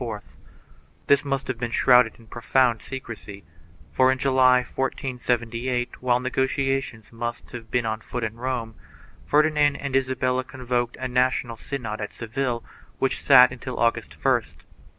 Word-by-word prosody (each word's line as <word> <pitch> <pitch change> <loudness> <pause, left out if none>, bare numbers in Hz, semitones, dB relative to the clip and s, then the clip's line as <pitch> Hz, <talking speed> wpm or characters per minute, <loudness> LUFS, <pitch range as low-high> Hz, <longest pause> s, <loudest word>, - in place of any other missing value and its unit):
3 115 -4 -3 0.9
This 140 0 +4
must 135 -1 -2
have 130 -3 -3
been 120 -1 -2
shrouded 125 -1 +4
in 115 - -18
profound 120 0 +1
secrecy, 110 -4 -8 0.5
for, 130 0 +4
in 130 - 0
July, 130 -1 +4
1478, 125 -2 -2
while 125 -1 +2
negotiations 130 -3 -1
must 120 0 -5
have 115 -2 -9
been 120 +1 0
on 110 0 -2
foot 120 +1 -5
in 110 -1 -2
Rome, 120 -1 -3 0.5
Fer 150 +1 +5
dinand 150 -2 +2
and 140 -2 -3
Isabella 130 -1 +1
convoked 125 -2 -3
a 130 - -2
national 125 -1 0
synod 115 -5 -5
at 105 - -5
Seville 120 +1 -3 0.3
which 135 - -1
sat 125 -3 +7
until 125 0 -7
August 115 0 0
1st. - - 0
125 Hz, 150 wpm, -24 LUFS, 115-130 Hz, 0.9 s, sat